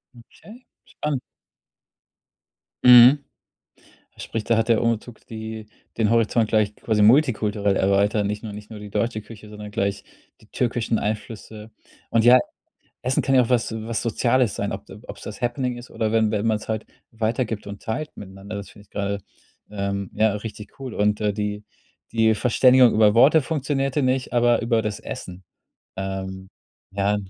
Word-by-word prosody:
Okay, 215 - -16 0.2
spannend. 150 -4 -3 1.6
Mhm. 125 +3 +8 0.9
Sprich, 115 -1 -4
da 115 +1 +1
hat 115 +1 +1
der 115 - +4
Umzug 115 0 -3
die 110 -1 -7 0.3
den 110 -2 +2
Horizont 115 -1 +2
gleich 105 -1 +1
quasi 110 -2 0
multikulturell 105 -5 +3
erweitert. 100 +2 +2
Nicht 105 +2 -4
nur 105 -2 -6
nicht 105 0 -10
nur 110 -2 -9
die 105 -1 -10
deutsche 115 -1 -1
Küche, 105 -1 -13
sondern 105 -1 -9
gleich 100 -2 -2 0.4
die - - -20
türkischen 120 -2 -1
Einflüsse. 110 0 -6 0.4
Und 115 -1 +3
ja, 125 +1 +8 0.6
Essen 130 +1 +1
kann 135 - +2
ja 125 - +6
auch 115 - -5
was 120 -2 +1
was 110 0 -3
Soziales 120 0 +1
sein, - - -3
ob - - -7
d - - -12
obs - - -9
das - - -8
Happening 125 0 -1
ist 120 - -11
oder 110 -1 -2
wenn 110 -1 +2
wenn 105 +1 -1
man 110 -1 +2
es - - -12
halt 110 -1 -3 0.3
weitergibt 110 -1 -2
und 100 0 -8
teilt 150 +7 -4
miteinander. 100 +1 -9
Das 100 - -8
finde 100 - -16
ich - - -29
gerade, 100 0 -3 0.5
ähm, 100 -1 -3
ja, 110 -1 +2
richtig 105 +2 -8
cool. 130 -3 -6
Und, 105 +1 +1
äh, 105 -1 +1
die 105 0 -3 0.5
die 110 -1 +3
Verständigung 125 +1 +5
über 105 -1 +5
Worte 145 +6 +6
funktionierte 135 -1 -1
nicht, 130 0 0
aber 120 -1 +3
über 115 -1 +1
das 105 -2 -4
Essen. 90 +1 -8 0.5
Ähm. 95 0 -5 0.4
Ja. 100 +1 +1
110 Hz, 165 wpm, -23 LUFS, 105-120 Hz, 1.6 s, Mhm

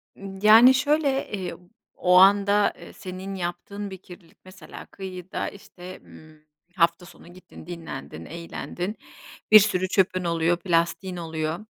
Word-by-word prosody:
Imm, 195 -1 -10
yani, 225 +5 +8
şöyle, 285 0 0
iii, 190 -3 -5 0.4
o 180 0 +2
anda, 200 +1 +4
eee, - - -12
senin 190 0 -8
yaptığın 195 +3 -5
bir 190 - -7
kirlilik, 180 -2 -16
mesela 185 -4 -12
kıyıda, 185 0 -6
işte, 185 -2 -12
ımm, 155 -1 -17 0.3
hafta 170 0 +1
sonu 175 -1 -16
gittin, 185 -3 -15
dinlendin, 160 - -8
eğlendin, 175 +4 -6 0.6
bir 215 - +11
sürü 185 -3 0
çöpün 185 -1 +1
oluyor, 170 0 0
plastiğin 175 +1 -1
oluyor. 160 0 -4
185 Hz, 135 wpm, -24 LUFS, 170-200 Hz, 0.6 s, bir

